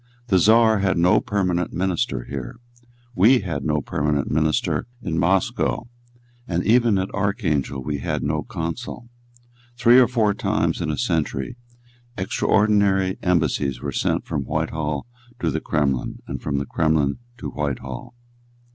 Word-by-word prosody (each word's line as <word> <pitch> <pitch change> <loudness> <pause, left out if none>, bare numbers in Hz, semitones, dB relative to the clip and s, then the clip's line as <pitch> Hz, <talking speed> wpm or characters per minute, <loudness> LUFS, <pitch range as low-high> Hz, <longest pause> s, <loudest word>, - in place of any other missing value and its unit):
The 95 -3 +4
Czar 110 +2 +5
had 95 -2 +1
no 90 +2 +4
permanent 90 -4 -1
minister 90 - -1
here. 65 - -6 0.6
We 115 +5 +5
had 80 -8 -4
no 75 -1 0
permanent 75 0 -1
minister 80 +7 +1 0.2
at 85 - -2
Moscow; 95 +6 +1 0.6
and 85 0 -1
even 115 -2 +4
at 95 +1 -2
Archangel 85 - -1
we 70 0 -3
had - - -2
no 75 +1 0
consul. 110 +5 -5 0.7
Three 125 0 +6
or 125 - +6
four 110 -5 +2
times - - 0
in - - -2
a 75 - -2
century 75 - -1 0.6
extraordinary 100 -1 +2
embassies 75 -7 +1
were - - -4
sent - - 0
from - - -2
Whitehall 75 -2 -2 0.3
to - - 0
the - - -2
Kremlin 70 -5 -1
and - - -6
from 70 -2 -2
the 70 - -1
Kremlin 75 - +1 0.2
to - - -6
Whitehall. 70 - -5
85 Hz, 140 wpm, -22 LUFS, 75-105 Hz, 0.7 s, Three